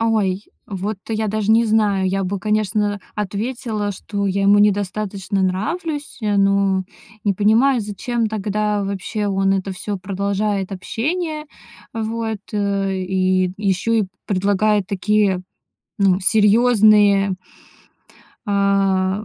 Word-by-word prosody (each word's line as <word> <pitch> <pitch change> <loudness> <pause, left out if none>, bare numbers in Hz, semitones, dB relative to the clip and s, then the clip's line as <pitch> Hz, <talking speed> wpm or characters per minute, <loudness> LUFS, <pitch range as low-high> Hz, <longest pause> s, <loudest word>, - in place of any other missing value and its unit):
Ой, 210 -4 +1 0.2
вот 200 +1 -4
я 220 -1 -1
даже 215 0 -1
не 230 +1 +4
знаю. 210 -4 +2
Я 195 +1 -1
бы, 195 +2 -2
конечно, 210 0 0
ответила, 210 +1 -3
что 200 +1 -4
я 195 +1 0
ему 200 +1 +5
недостаточно 200 -1 0
нравлюсь, 295 - -3
э, 205 -1 +1
но 195 -1 +2 0.4
не 205 - +3
понимаю, 230 +6 +3
зачем 225 +3 -2
тогда 210 0 -1
вообще 200 +2 -3
он 195 0 +1
это 195 0 -2
всё 200 +2 -4
продолжает 200 +1 -2
общение. 305 - -3 0.5
Вот, 225 -1 -3
э, 200 -2 0
и 185 0 +1
ещё 200 +2 0
и 225 -2 +3 0.2
предлагает 205 +1 +1
такие, 200 -1 +1 0.6
ну, 195 -2 +3
серьёзные 210 -1 +4 1.1
а 195 -1 +1
205 Hz, 115 wpm, -20 LUFS, 195-215 Hz, 1.1 s, ему